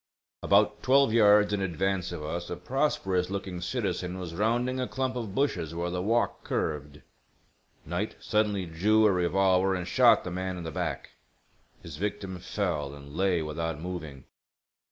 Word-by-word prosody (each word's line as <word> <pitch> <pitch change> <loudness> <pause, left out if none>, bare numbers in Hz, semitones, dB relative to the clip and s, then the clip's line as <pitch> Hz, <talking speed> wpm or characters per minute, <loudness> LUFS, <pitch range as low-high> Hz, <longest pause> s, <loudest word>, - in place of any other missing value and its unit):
About - - +3
twelve 135 -3 +4
yards 105 -2 +5
in 100 - 0
advance 95 0 -1
of 85 -3 -6
us 85 +3 -4
a - - -3
prosperous 95 -4 0
looking 95 -2 -4
citizen 90 +1 -2
was 90 -3 -6
rounding 120 +7 0
a 125 - -1
clump 130 -1 -2
of 110 -5 -5
bushes 85 - -1
where 85 +1 -2
the 90 0 -2
walk 115 +5 0
curved. 75 -1 -3 0.8
Knight 90 +7 -3
suddenly 105 -3 0
drew 105 +7 +3
a 105 - +5
revolver 95 +1 +2
and 90 -1 -4
shot 120 -2 +5
the 90 - -5
man 95 +1 -3
in 85 - -6
the 80 - -5
back. - - -4 0.7
His 80 -4 -8
victim 95 -1 -4
fell 85 -7 -2
and 70 +1 -12
lay 90 -3 +1
without 80 0 -3
moving. 80 -6 -6
95 Hz, 160 wpm, -28 LUFS, 85-105 Hz, 0.8 s, yards